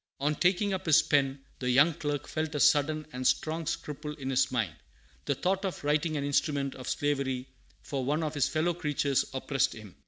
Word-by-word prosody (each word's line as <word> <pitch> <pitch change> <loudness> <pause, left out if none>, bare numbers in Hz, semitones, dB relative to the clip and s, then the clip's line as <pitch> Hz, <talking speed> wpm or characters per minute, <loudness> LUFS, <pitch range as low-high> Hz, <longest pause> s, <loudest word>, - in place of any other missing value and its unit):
"] - - -53
On 150 - +2
taking 185 +5 +2
up 190 -1 -4
his 160 0 +6
pen, 140 -3 +1 0.2
the 125 - -1
young 145 +7 +5
clerk 145 -2 -3
felt 155 0 -3
a - - 0
sudden 155 +2 +3
and 125 0 0
strong 160 0 0
scruple 150 0 -4
in 135 -3 -4
his 130 0 +2
mind. 110 -10 -1 0.5
The 140 - 0
thought 190 +6 0
of 190 -6 -4
writing 150 +2 +1
an 140 - -2
instrument 140 -1 0
of 130 - -7
slavery 135 -3 -1 0.4
for 135 -2 -3
one 150 +5 0
of 155 -1 -2
his 145 -4 +1
fellow 160 +2 +1
creatures 145 -4 0
oppressed 135 0 0
him. 105 -4 -11
145 Hz, 205 wpm, -29 LUFS, 135-155 Hz, 0.5 s, his